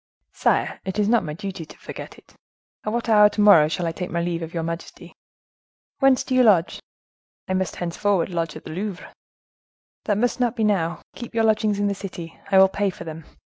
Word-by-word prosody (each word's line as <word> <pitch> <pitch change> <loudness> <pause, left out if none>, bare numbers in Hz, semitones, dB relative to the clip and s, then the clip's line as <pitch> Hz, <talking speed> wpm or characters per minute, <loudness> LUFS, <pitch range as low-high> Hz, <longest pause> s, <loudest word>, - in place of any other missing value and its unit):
"Sire, - - 0
it 190 +1 -4
is 210 -1 +2
not 235 +1 +3
my 150 - -5
duty 190 -2 -6
to 155 - -14
forget - - -9
it! - - -21 0.5
At 215 - -2
what 235 +1 -2
hour 210 -2 +6
to 210 - -8
morrow 200 -8 +7
shall 170 +2 -2
I 165 - 0
take 180 +2 -5
my 170 - -2
leave 170 0 -2
of 165 0 -6
your 165 -1 -3
majesty?" 165 +1 -7 0.9
"Whence 270 -2 +4
do 260 - -4
you 255 - +5
lodge?" 195 -8 +3 0.7
"I 185 - -1
must 185 0 -1
henceforward 180 +1 0
lodge 165 -3 -3
at - - -9
the - - -8
Louvre." 190 +2 -5 0.9
"That 205 - +1
must 245 +3 0
not 245 -1 +1
be 225 - -1
now—keep 210 +4 -2
your 225 - +2
lodgings 215 -1 +2
in 205 - +1
the 200 - +1
city: 180 -4 -8
I 195 - +4
will 190 0 +8
pay 200 +1 -1
for 175 - -8
them. 160 -1 -8
195 Hz, 210 wpm, -23 LUFS, 170-215 Hz, 0.9 s, will